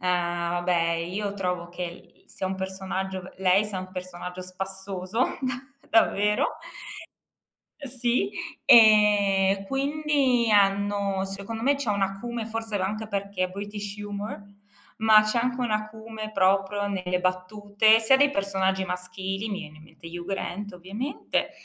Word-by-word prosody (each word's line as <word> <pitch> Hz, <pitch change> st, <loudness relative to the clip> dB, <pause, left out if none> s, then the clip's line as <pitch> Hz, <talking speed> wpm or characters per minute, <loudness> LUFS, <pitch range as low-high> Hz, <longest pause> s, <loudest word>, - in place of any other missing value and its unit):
vabbè 175 Hz, -1 st, 0 dB
io 185 Hz, +5 st, -3 dB
trovo 180 Hz, -3 st, -2 dB
che 175 Hz, +1 st, -7 dB
i 175 Hz, 0 st, -9 dB
sia 190 Hz, -, -5 dB
un 190 Hz, 0 st, -3 dB
personaggio 190 Hz, 0 st, -4 dB
lei 190 Hz, +2 st, +3 dB
sia 205 Hz, -3 st, -4 dB
un 185 Hz, 0 st, -7 dB
personaggio 180 Hz, 0 st, -6 dB
spassoso, 190 Hz, +4 st, -3 dB
da 260 Hz, -2 st, -1 dB, 0.4 s
davvero. 210 Hz, -2 st, +3 dB, 1.3 s
Ehm, 280 Hz, -, -5 dB
sì. 240 Hz, -5 st, 0 dB, 0.4 s
Ehm, 205 Hz, -3 st, +6 dB
quindi 275 Hz, -2 st, +1 dB
hanno 200 Hz, -1 st, +2 dB
secondo 200 Hz, +4 st, -6 dB
me 280 Hz, +4 st, +4 dB
c'è 275 Hz, -6 st, -2 dB
un 200 Hz, -1 st, 0 dB
acume, 225 Hz, +4 st, -3 dB
forse 225 Hz, -1 st, -3 dB
l -, -, -1 dB
anche 215 Hz, +3 st, -3 dB
perché 200 Hz, -2 st, -2 dB
è -, -, -2 dB
British 205 Hz, +1 st, -6 dB
Humor, 205 Hz, 0 st, -6 dB, 0.6 s
ma 220 Hz, -1 st, +7 dB
c'è 215 Hz, +3 st, 0 dB
anche 250 Hz, +1 st, -1 dB
un 245 Hz, -2 st, -1 dB
acume 215 Hz, 0 st, -4 dB
proprio 195 Hz, +1 st, +2 dB
nelle 180 Hz, -2 st, -1 dB
battute, 205 Hz, +4 st, +2 dB
sia 230 Hz, +4 st, +5 dB
dei 285 Hz, +1 st, +5 dB
personaggi 190 Hz, -3 st, 0 dB
maschili, 190 Hz, +3 st, -4 dB
mi 200 Hz, -2 st, -3 dB
viene 155 Hz, -5 st, -10 dB
in -, -, -15 dB
mente 165 Hz, -, -15 dB
Hugh 170 Hz, +1 st, -7 dB
Grant 200 Hz, +1 st, -4 dB
ovviamente, 205 Hz, +10 st, -3 dB
200 Hz, 140 wpm, -26 LUFS, 185-215 Hz, 1.3 s, ma